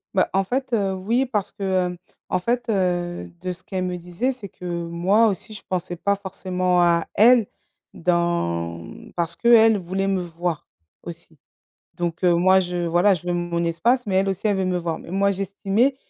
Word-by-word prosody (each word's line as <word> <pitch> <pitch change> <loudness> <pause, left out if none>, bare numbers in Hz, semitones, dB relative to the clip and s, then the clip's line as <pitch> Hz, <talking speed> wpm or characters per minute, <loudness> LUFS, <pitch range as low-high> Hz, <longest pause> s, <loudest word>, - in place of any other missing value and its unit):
Bah, 185 - +3
en 195 - +2
fait, 255 +5 -3
heu, 200 -4 +1
oui 225 +8 0
parce 210 -6 -2
que, 205 0 -8 0.2
hem, 180 0 -4 0.3
en - - +1
fait, 235 +5 -1
heu, 175 - -1
de 185 - -3
ce 180 - -10
qu'elles 185 -2 -3
me 180 0 -2
disaient, 180 +9 -2
c'est 240 -7 -9
que, 180 - -12
moi 175 +5 +1
aussi, 215 +2 -3
je 205 - -9
pensais 180 -1 -3
pas 200 +4 +1
forcément 185 -2 -1
à 170 -1 +3
elles 235 +1 +6 0.5
dans 170 - 0
mmh, 85 - -12
parce 170 -1 -2
qu'elles 225 -2 +5
voulaient 190 +1 -2
me 190 -2 0
voir 170 -1 -4 0.4
aussi. 165 -2 -10 0.6
Donc 170 0 -3
heu, 175 -1 +5
moi, 185 +2 +5
je 175 -1 -2
voilà, 175 +4 +4
je 175 -2 -5
veux 175 - +1
mon 175 -1 -1
espace 235 +10 +1
mais 190 - 0
elles 190 +1 +3
aussi, 195 +3 -2
elles 205 -2 +1
veulent 190 -1 0
me 180 -1 0
voir. 170 -1 -3
Mais - - -11
moi, 200 +1 +2
j'estimais 200 +6 0
185 Hz, 200 wpm, -23 LUFS, 175-200 Hz, 0.6 s, elles